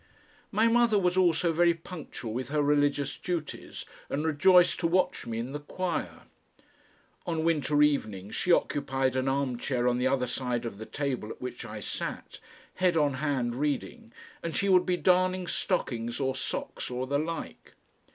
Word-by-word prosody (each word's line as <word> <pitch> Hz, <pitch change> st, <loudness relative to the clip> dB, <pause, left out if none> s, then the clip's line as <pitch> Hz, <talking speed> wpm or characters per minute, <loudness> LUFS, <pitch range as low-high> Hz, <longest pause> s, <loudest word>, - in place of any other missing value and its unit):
My 220 Hz, +3 st, +3 dB
mother 230 Hz, -2 st, +4 dB
was 180 Hz, -2 st, +2 dB
also 170 Hz, -2 st, +3 dB
very 170 Hz, +1 st, +4 dB
punctual 160 Hz, -9 st, -7 dB
with 125 Hz, +2 st, -4 dB
her 150 Hz, 0 st, +1 dB
religious 145 Hz, -1 st, +1 dB
duties, 170 Hz, -4 st, -5 dB, 0.2 s
and 150 Hz, +3 st, -1 dB
rejoiced 180 Hz, +4 st, +5 dB
to 170 Hz, -, +1 dB
watch 180 Hz, -7 st, +1 dB
me 115 Hz, -1 st, -3 dB
in 120 Hz, +3 st, -4 dB
the 145 Hz, -, -4 dB
choir. 175 Hz, +4 st, -4 dB, 1.0 s
On 165 Hz, -2 st, -1 dB
winter 150 Hz, -2 st, +3 dB
evenings 105 Hz, -10 st, 0 dB
she 180 Hz, -, 0 dB
occupied 135 Hz, -5 st, +1 dB
an 130 Hz, 0 st, 0 dB
armchair 130 Hz, -2 st, 0 dB
on 125 Hz, 0 st, +2 dB
the 125 Hz, -, +2 dB
other 130 Hz, -1 st, +1 dB
side 125 Hz, -1 st, -2 dB
of 105 Hz, -3 st, -6 dB
the 110 Hz, -, -7 dB
table 135 Hz, -6 st, -3 dB
at -, -, -8 dB
which 125 Hz, -1 st, -6 dB
I 105 Hz, -1 st, -7 dB
sat, -, -, -5 dB, 0.3 s
head 180 Hz, -2 st, +2 dB
on 145 Hz, -3 st, +3 dB
hand 130 Hz, -4 st, -1 dB
reading, 140 Hz, -3 st, -3 dB, 0.3 s
and 165 Hz, -1 st, -3 dB
she 200 Hz, -, +1 dB
would 180 Hz, -1 st, +5 dB
be 180 Hz, -1 st, +2 dB
darning 185 Hz, 0 st, +2 dB
stockings 120 Hz, -11 st, -1 dB
or 135 Hz, -1 st, 0 dB
socks 130 Hz, -, -4 dB
or 125 Hz, +1 st, -3 dB
the 140 Hz, +2 st, 0 dB
like. 165 Hz, +2 st, -6 dB
145 Hz, 170 wpm, -29 LUFS, 125-175 Hz, 1.0 s, rejoiced